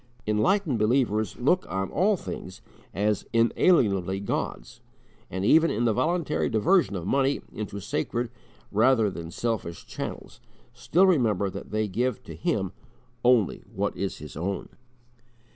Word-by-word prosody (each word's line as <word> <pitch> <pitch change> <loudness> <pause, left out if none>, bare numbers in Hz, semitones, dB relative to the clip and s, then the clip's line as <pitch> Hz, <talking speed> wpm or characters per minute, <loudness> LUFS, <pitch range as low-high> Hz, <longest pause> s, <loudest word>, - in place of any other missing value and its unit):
Enlightened 140 - +1
believers 110 -1 +1
look 175 +9 +2
on 95 +1 -2
all 195 +5 +2
things 90 - -7 0.3
as 105 +2 0
inalienably 105 - +3
God's, 100 - -4 0.5
and, 95 +2 -3
even 160 +8 +5
in 120 +3 0
the 115 - +3
voluntary 170 - 0
diversion 155 - +3
of 85 -3 -4
money 135 +5 +1
into 100 -1 -5
sacred 120 +4 -2 0.4
rather 110 0 +3
than 85 -2 -7
selfish 95 -4 -3
channels, - - -7 0.3
still 180 +4 +3
remember 110 - +2
that - - -8
they 110 0 0
give 120 +4 -1
to 80 - -9
Him 95 +3 -1 0.5
only 120 -5 +3
what - - -1
is - - -3
His - - -10
own! 95 +6 -3
110 Hz, 135 wpm, -26 LUFS, 100-135 Hz, 0.5 s, even